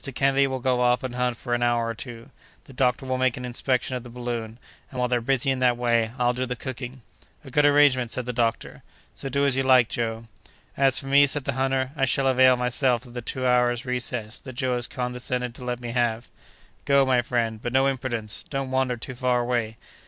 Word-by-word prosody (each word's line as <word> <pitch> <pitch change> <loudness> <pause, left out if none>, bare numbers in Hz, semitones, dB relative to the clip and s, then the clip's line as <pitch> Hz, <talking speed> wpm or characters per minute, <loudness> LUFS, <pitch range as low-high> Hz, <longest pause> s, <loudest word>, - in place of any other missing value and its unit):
Kennedy 135 0 +3
will 130 -1 -3
go 125 0 +1
off 125 0 +2
and 130 -2 -4
hunt 125 -1 -1
for 120 0 -4
an 120 - 0
hour 120 -1 +2
or 115 - -2
two; 115 0 -9 0.3
the 135 - -15
doctor 125 0 0
will 130 0 -2
make 130 -2 +1
an 125 - -6
inspection 125 +1 -1
of 125 - -4
the 120 - -11
balloon, 120 -2 -5 0.3
and, 130 - -10
while 125 0 +1
they're 120 -1 0
busy 135 +2 +1
in 130 - -2
that 125 -1 +3
way, 115 -2 +1
I'll 125 -1 +2
do 130 +1 -2
the 125 - -3
cooking." 130 0 -7 0.4
"A 135 - -10
good 145 +2 +4
arrangement!" 145 -4 +4
said 125 +1 -1
the 125 - -3
doctor; 115 -1 -2 0.3
"so 135 - -6
do 140 +2 +1
as 140 -2 +3
you 135 - +1
like, 130 -3 +4
Joe." 115 -1 -3 0.5
"As 135 -1 +5
for - - -8
me," 140 +1 +5
said 145 0 -2
the - - -2
hunter, 130 0 0
"I 135 - +1
shall 135 +1 0
avail 130 -1 +5
myself 125 0 +1
of 120 - -13
the 120 - -5
two 130 +2 -3
hours' 125 -1 +2
recess 125 -3 -3
that 130 - -10
Joe 125 +1 -1
has 120 0 -1
condescended 125 -1 -3
to 125 - -11
let 125 -1 -3
me 120 -1 -6
have." 120 -1 -1 0.6
"Go, 140 -1 +4
my 130 -2 +3
friend, 115 -3 -2
but 120 - -3
no 135 +1 +3
imprudence! 120 -5 -2
Don't 135 -2 -3
wander 130 -2 0
too 130 +3 -6
far 125 0 +1
away." 120 -2 -2
125 Hz, 230 wpm, -25 LUFS, 120-130 Hz, 0.6 s, As